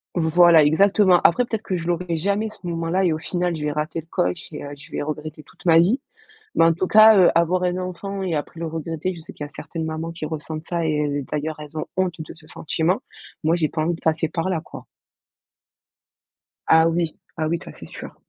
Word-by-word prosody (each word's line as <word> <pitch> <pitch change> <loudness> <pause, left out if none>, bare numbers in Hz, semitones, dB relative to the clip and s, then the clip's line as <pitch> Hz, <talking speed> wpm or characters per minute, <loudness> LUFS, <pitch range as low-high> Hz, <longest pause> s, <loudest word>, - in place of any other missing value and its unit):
Voilà, 170 -1 +6
exactement, 190 +4 +4
après, 245 +9 +4
peut-être, 220 -3 -3
que 190 -4 -2
je 165 -1 -5
l'aurais 175 0 -1
jamais 200 +6 0
ce 215 - -12
moment-là 170 +2 -1
et 170 - +2
au 155 - -3
final, 175 +1 -1
je 155 - -5
vais 150 - 0
rater 150 +2 -3
le 165 - -27
coche 90 - -2
et - - -7
heu, 145 - -7
je 145 +3 -13
vais - - -3
regretter 155 0 -6
toute - - -21
ma 165 -2 +6
vie. 200 +11 +3 0.5
Mais - - +5
en 165 0 +4
tout 180 +3 -1
cas, 220 +2 +8
heu, 180 - +6
avoir 170 +2 +2
un 180 0 0
enfant 190 +2 -5
et 180 -3 -1
après 155 +2 -4
le 165 - -2
regretter 165 +2 -3
je 170 - -10
sais 160 - -10
qu'il 145 - -7
y - - -12
a - - -28
certaines 165 -2 -6
mamans 160 +1 -4
qui 165 -2 -5
ressentent 155 0 -6
ça 170 -1 -1
et 150 -2 0
d 145 0 -2
d'ailleurs, 155 +1 -3
elles 150 +1 -10
ont - - -3
honte 185 -2 0
de 155 - -8
ce 160 -1 -18
sentiment. 165 +4 -1 0.4
Moi 160 +2 +3
j'ai 160 -3 +1
pas 155 - -2
envie 170 +2 0
de 165 - -10
passer 160 0 +1
par 165 +4 -2
là, 170 -4 0
quoi. - - -11 1.8
Ah 160 0 +6
oui, 165 -1 -1 0.2
ah 155 -1 0
oui, 170 +2 0
ça - - -10
c'est - - -11
sûr. - - -10
165 Hz, 240 wpm, -22 LUFS, 155-180 Hz, 1.8 s, cas